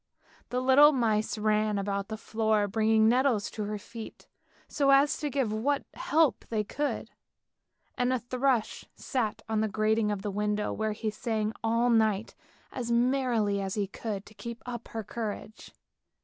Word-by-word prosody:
The 250 0 -1
little 275 +3 +7
mice 220 -4 +1
ran 215 0 +1
about 200 0 -2
the 220 - -5
floor 220 -1 0
bringing 220 +1 +3
nettles 245 -3 +2
to 215 - -4
her 210 +1 -3
feet, 225 +2 -10 0.4
so 280 -2 +1
as 275 +2 +5
to 295 - -2
give 265 -6 0
what 275 +6 0
help 310 -2 +2
they 215 -2 0
could, 290 +8 -3 0.8
and 250 0 +1
a 255 - +2
thrush 250 -1 0
sat 225 -4 -2
on 220 -1 0
the 220 - +1
grating 215 +1 +1
of 205 -2 -3
the 205 - -2
window 210 +1 -1
where 220 -1 -1
he 215 0 -3
sang 215 0 -2
all 230 +2 +2
night, 220 -2 +2 0.4
as 240 -2 -4
merrily 235 -4 +2
as 190 -1 -3
he 205 -2 0
could 200 0 -5
to 210 - -15
keep 235 +1 -8
up 240 -1 -6
her 225 -1 -5
courage. 220 0 -6
220 Hz, 165 wpm, -29 LUFS, 210-245 Hz, 0.8 s, little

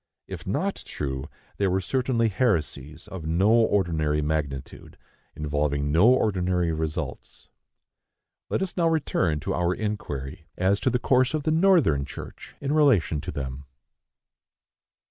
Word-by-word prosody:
If - - -8
not - - 0
true, 65 -1 -5 0.3
they 100 - +2
were 95 +1 +1
certainly 120 +3 0
heresies 80 - -1
of 85 -5 -7
no 90 +6 +3
ordinary 85 -10 +2
magnitude, 75 -3 -4 0.4
involving 75 -1 -1
no 85 +8 +5
ordinary 90 -8 +2
results. 80 -1 -5 1.0
Let - - 0
us 190 - -5
now 170 -2 +2
return 95 - +1
to - - -2
our 90 +1 +1
inquiry 80 -7 -5
as 95 +2 +2
to - - +1
the 125 - +1
course 130 +3 +2
of 155 - -2
the 155 - +1
Northern 160 - +4
church - - -10
in 140 +1 -2
relation 115 - +3
to - - -5
them. 70 0 -5
90 Hz, 135 wpm, -25 LUFS, 75-120 Hz, 1.0 s, no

